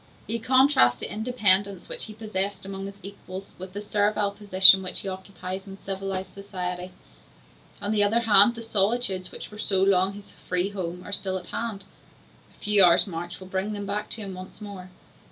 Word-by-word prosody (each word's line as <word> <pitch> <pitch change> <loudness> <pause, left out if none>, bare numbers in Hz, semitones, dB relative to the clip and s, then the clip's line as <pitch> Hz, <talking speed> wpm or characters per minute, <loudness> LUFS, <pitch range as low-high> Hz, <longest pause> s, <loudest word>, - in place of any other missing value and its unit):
He 230 - -2
contrasts 255 - +4
the - - -5
independence 205 -4 +2
which - - -4
he 215 - -9
possessed 200 -3 -3
amongst 195 0 -6
his 200 0 -11
equals 195 0 -9
with 185 0 -9
the 205 +1 -6
servile 205 0 0
position 195 -2 +7
which 185 - -3
he - - -7
occupies 190 0 -7
in 195 0 -9
civilized 195 -1 -5
society. 180 -2 -5 0.9
On 205 - -1
the 210 -1 +3
other 225 +3 +2
hand, 220 +1 +6
the 230 - -8
solitudes 200 -3 0
which - - -9
were 210 - -11
so 190 -3 +2
long 195 0 +3
his 205 0 -12
free 180 +1 -2
home 180 -3 -5
are 205 - -6
still 190 -1 0
at 180 - -9
hand; 215 -4 -3 0.7
a - - -26
few 210 -2 +6
hours' 175 0 +5
march 175 -1 -7
will 190 - -10
bring 190 +3 -3
him 205 0 -5
back 210 +1 -4
to 225 - -2
them 195 -2 -6
once 185 +2 -10
more. 200 -3 -9
195 Hz, 190 wpm, -25 LUFS, 185-210 Hz, 0.9 s, position